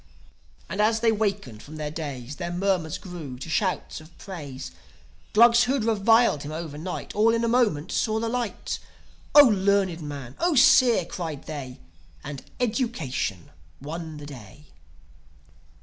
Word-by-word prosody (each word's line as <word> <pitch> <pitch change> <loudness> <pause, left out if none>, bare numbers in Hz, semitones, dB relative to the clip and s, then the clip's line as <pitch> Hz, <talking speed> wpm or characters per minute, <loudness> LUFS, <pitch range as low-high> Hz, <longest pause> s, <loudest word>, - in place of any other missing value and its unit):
And, 200 - -2
as 220 +1 +2
they 230 -1 +4
wakened 200 - -2
from 155 - -11
their 150 -1 -4
daze, 145 -4 -6
Their 175 -1 -4
murmurs 175 -3 0
grew 165 -9 -8
to 135 +6 -8
shouts 185 -3 -1
of 155 +2 -17
praise. 145 -9 -8 0.6
Glugs 235 +2 +6
who'd 260 -1 0
reviled 225 -5 +3
him 145 - -6
overnight 160 +2 -5
All 225 +2 +4
in 230 - 0
a - - +2
moment 220 -10 +1
saw 220 -1 0
the 230 - -2
light. 240 -2 -3 0.6
"O 290 - +12
learned 200 -6 +2
man! 140 -4 -7
0 345 -2 +2
seer!" 245 -6 +6
cried 160 -6 -5
they.... 135 -5 -7 0.4
And 140 -1 -6 0.2
education 215 - -2 0.3
won 160 +2 -6
the 145 - -9
day. 135 -1 -11
175 Hz, 145 wpm, -25 LUFS, 145-225 Hz, 0.6 s, O